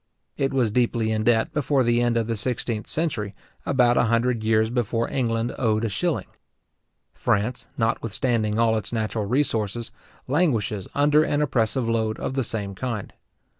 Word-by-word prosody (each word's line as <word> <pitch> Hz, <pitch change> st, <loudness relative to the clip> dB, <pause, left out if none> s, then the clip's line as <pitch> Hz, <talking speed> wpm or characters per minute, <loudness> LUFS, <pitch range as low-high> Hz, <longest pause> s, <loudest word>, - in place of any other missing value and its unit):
It 135 Hz, -1 st, 0 dB
was 125 Hz, -5 st, +1 dB
deeply 115 Hz, -1 st, +1 dB
in 110 Hz, 0 st, -1 dB
debt 115 Hz, +3 st, +2 dB
before 145 Hz, -3 st, +2 dB
the 120 Hz, 0 st, +2 dB
end 120 Hz, -1 st, +2 dB
of 115 Hz, -, +1 dB
the 115 Hz, +1 st, -2 dB
sixteenth 110 Hz, 0 st, -2 dB
century, 110 Hz, -12 st, -2 dB, 0.3 s
about 125 Hz, -3 st, +3 dB
a -, -, +4 dB
hundred 115 Hz, 0 st, +1 dB
years 110 Hz, 0 st, +2 dB
before 115 Hz, -1 st, 0 dB
England 115 Hz, -2 st, 0 dB
owed 110 Hz, -2 st, +1 dB
a -, -, 0 dB
shilling. 110 Hz, -, -1 dB, 0.9 s
France, 115 Hz, +3 st, -1 dB
notwithstanding 115 Hz, -1 st, 0 dB
all 115 Hz, -1 st, +3 dB
its -, -, -7 dB
natural 110 Hz, -2 st, -2 dB
resources, 115 Hz, -3 st, -1 dB, 0.4 s
languishes 125 Hz, -, 0 dB
under 150 Hz, +1 st, +4 dB
an 145 Hz, -1 st, +1 dB
oppressive 120 Hz, -2 st, 0 dB
load 110 Hz, -1 st, 0 dB
of -, -, -3 dB
the 135 Hz, -1 st, 0 dB
same 105 Hz, -3 st, -3 dB
kind. 115 Hz, 0 st, -4 dB
115 Hz, 160 wpm, -24 LUFS, 110-125 Hz, 0.9 s, a